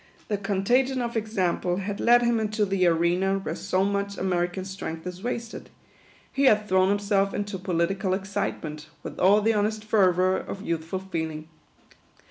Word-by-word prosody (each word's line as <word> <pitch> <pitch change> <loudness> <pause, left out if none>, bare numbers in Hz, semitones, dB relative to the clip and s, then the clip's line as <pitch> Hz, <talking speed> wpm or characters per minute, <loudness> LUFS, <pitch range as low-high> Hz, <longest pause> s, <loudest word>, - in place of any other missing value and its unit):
The 205 - 0
contagion 240 +7 +1
of 235 -1 -3
example 190 -5 0
had 200 +2 -4
led 240 +1 +5
him 235 -1 +2
into 215 0 0
the 190 -2 +2
arena 175 +3 +2
where 195 - -4
so 190 -1 0
much 200 0 -1
American 180 0 -1
strength 180 -4 -6
is 180 0 -6
wasted; 235 -1 -5 0.6
he 275 - +2
had 215 -4 +4
thrown 185 0 +3
himself 200 -1 +1
into 205 -2 -3
political 185 +2 0
excitement, 155 -6 -4 0.2
with - - -7
all 205 +3 +5
the 225 +1 +3
honest 215 +1 0
fervour 185 -3 +3
of 195 - -6
youthful 165 +1 -2
feeling. 160 -4 -5
195 Hz, 155 wpm, -26 LUFS, 180-210 Hz, 0.6 s, led